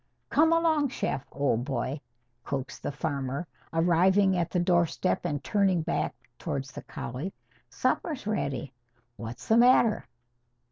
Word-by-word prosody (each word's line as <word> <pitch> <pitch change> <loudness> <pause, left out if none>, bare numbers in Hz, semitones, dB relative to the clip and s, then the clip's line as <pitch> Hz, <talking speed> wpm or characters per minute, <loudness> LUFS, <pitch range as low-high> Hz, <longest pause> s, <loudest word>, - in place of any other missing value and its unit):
"Come 320 +2 +5
along, 320 -4 +3
Shep, 140 - -3
old 135 -4 +1
boy!" 140 +1 -2 0.4
coaxed 135 -1 -4
the - - -2
farmer, 140 +1 -3 0.3
arriving 185 +4 +4
at 175 -2 0
the 180 - 0
doorstep 175 0 +1
and 145 -1 -2
turning 195 -5 +2
back 170 - -1 0.2
towards 140 +1 -3
the - - -8
collie. 135 +11 -6 0.3
"Supper's 305 - -1
ready. 140 - -2 0.4
What's 115 +1 -7
the 225 - +5
matter?" 240 -2 +5
170 Hz, 130 wpm, -28 LUFS, 140-205 Hz, 0.4 s, Come